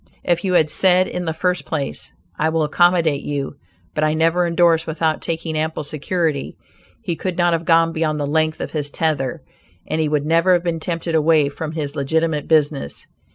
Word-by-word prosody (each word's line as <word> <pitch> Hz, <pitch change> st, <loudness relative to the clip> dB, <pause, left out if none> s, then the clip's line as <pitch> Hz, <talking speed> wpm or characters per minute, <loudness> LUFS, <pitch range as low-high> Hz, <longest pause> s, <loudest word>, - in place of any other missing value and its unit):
If 175 Hz, -1 st, 0 dB
you 185 Hz, -2 st, 0 dB
had 160 Hz, -3 st, +4 dB
said 185 Hz, 0 st, +4 dB
in 180 Hz, -, -4 dB
the 160 Hz, -, -1 dB
first 180 Hz, +3 st, -1 dB
place, 145 Hz, -4 st, -4 dB, 0.2 s
"I 155 Hz, -, +1 dB
will 160 Hz, 0 st, +1 dB
accommodate 165 Hz, -1 st, +2 dB
you, 140 Hz, -2 st, -4 dB, 0.4 s
but 155 Hz, -, -1 dB
I 155 Hz, 0 st, +2 dB
never 165 Hz, +2 st, +2 dB
indorse 170 Hz, -1 st, +3 dB
without 160 Hz, 0 st, -1 dB
taking 165 Hz, -1 st, -3 dB
ample 155 Hz, 0 st, -2 dB
security," 155 Hz, 0 st, -2 dB, 0.5 s
he 170 Hz, -, -2 dB
could 175 Hz, +2 st, -4 dB
not 175 Hz, -1 st, +3 dB
have 165 Hz, 0 st, -1 dB
gone 165 Hz, 0 st, +4 dB
beyond 155 Hz, -2 st, -1 dB
the 145 Hz, -, -1 dB
length 155 Hz, +2 st, 0 dB
of -, -, -4 dB
his 145 Hz, -2 st, -3 dB
tether, 145 Hz, -5 st, -2 dB, 0.4 s
and 155 Hz, +1 st, -1 dB
he 155 Hz, -, 0 dB
would 150 Hz, -1 st, 0 dB
never 165 Hz, +3 st, +3 dB
have 175 Hz, -1 st, +2 dB
been 170 Hz, -2 st, -1 dB
tempted 165 Hz, 0 st, -3 dB
away 155 Hz, -2 st, +3 dB
from 155 Hz, +2 st, -6 dB
his 150 Hz, -3 st, -4 dB
legitimate 155 Hz, +2 st, 0 dB
business. 150 Hz, -, 0 dB
160 Hz, 195 wpm, -20 LUFS, 150-170 Hz, 0.5 s, had